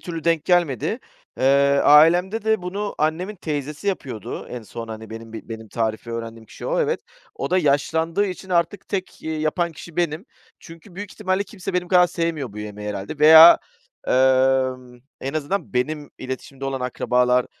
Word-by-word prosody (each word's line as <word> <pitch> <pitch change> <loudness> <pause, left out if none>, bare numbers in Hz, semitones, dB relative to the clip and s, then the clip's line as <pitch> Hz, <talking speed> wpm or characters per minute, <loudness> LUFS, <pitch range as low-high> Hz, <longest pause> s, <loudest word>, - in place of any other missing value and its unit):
türlü 165 -3 -6
denk 165 -2 +1
gelmedi. 175 - +1 0.4
Eee, - - 0 0.4
ailemde 175 +8 +5
de 220 -3 +1
bunu 200 +3 -4
annemin 170 +7 -1
teyzesi 150 +2 -4
yapıyordu 130 - -5
en 125 -2 -7
son, 115 +1 -8
hani, 110 0 -8
benim 115 0 -9
bi 110 - -9
benim 110 -1 -8
tarifi 110 +1 -3
öğrendiğim 115 -1 -7
kişi - - -9
o, - - 0
evet. 470 0 0 0.3
O 440 - -4
da 185 - +3
yaşlandığı 160 +4 +1
için 190 0 -7
artık 175 +2 0
tek, 190 -2 -4
eee, 160 - -3
yapan 165 +3 -1
kişi 160 +1 -12
benim. 170 +1 -1 0.4
Çünkü 165 +3 -14
büyük 205 +2 -7
ihtimalle 190 -2 -1
kimse 205 -5 -7
benim 180 -1 -1
kadar 180 -1 +5
sevmiyor 165 -8 -3
bu 105 - -9
yemeği 105 0 -6
herhâlde. 100 +8 -5
Veya, 160 +2 +9 0.5
emm, 130 -1 +2 0.2
en 135 +3 -4
azından 155 +5 -3
benim 145 +4 -2
iletişimde 130 +1 -7
olan 135 -1 -3
akrabalar 125 0 +1
155 Hz, 165 wpm, -22 LUFS, 125-180 Hz, 0.5 s, Veya